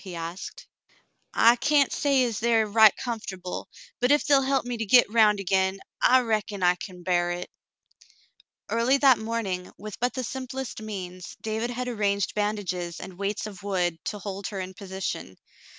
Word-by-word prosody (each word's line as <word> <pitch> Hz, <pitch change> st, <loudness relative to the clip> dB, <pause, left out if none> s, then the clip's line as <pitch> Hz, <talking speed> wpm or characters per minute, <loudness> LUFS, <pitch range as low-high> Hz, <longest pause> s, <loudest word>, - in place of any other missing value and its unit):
" -, -, -17 dB
he 185 Hz, -3 st, -7 dB
asked. 170 Hz, +3 st, -7 dB, 0.7 s
"I 230 Hz, +1 st, +6 dB
cyan't 285 Hz, -1 st, +3 dB
say 275 Hz, -3 st, +2 dB
as 230 Hz, -3 st, -1 dB
they 235 Hz, +1 st, +1 dB
air 225 Hz, -1 st, +4 dB
right 215 Hz, 0 st, +6 dB
comfortable, 200 Hz, -7 st, -5 dB, 0.3 s
but 250 Hz, +2 st, +2 dB
ef 290 Hz, -, +3 dB
they'll 280 Hz, -2 st, +5 dB
help 270 Hz, -1 st, +1 dB
me 245 Hz, -1 st, -3 dB
to 225 Hz, -, -2 dB
git 245 Hz, +4 st, +6 dB
'round 215 Hz, -2 st, +4 dB
agin, 190 Hz, 0 st, +1 dB, 0.2 s
I 255 Hz, 0 st, +6 dB
reckon 215 Hz, -4 st, -2 dB
I 180 Hz, 0 st, +5 dB
can 180 Hz, 0 st, -10 dB
bar 175 Hz, -1 st, +1 dB
hit." 175 Hz, 0 st, -4 dB, 1.2 s
Early 235 Hz, +4 st, +2 dB
that 270 Hz, -3 st, +5 dB
morning, 220 Hz, -5 st, -3 dB
with 210 Hz, 0 st, -8 dB
but 245 Hz, +1 st, 0 dB
the 255 Hz, -, -2 dB
simplest 260 Hz, -1 st, -5 dB
means, 185 Hz, -4 st, -7 dB
David 220 Hz, +2 st, -2 dB
had 250 Hz, +1 st, -4 dB
arranged 200 Hz, -5 st, 0 dB
bandages 195 Hz, -5 st, -2 dB
and 185 Hz, 0 st, -9 dB
weights 200 Hz, +2 st, -2 dB
of 205 Hz, -3 st, -8 dB
wood 180 Hz, -5 st, -1 dB
to 210 Hz, -, -3 dB
hold 200 Hz, -1 st, -5 dB
her 200 Hz, -, -5 dB
in 185 Hz, 0 st, -5 dB
position. 190 Hz, -, -5 dB
210 Hz, 180 wpm, -26 LUFS, 185-240 Hz, 1.2 s, I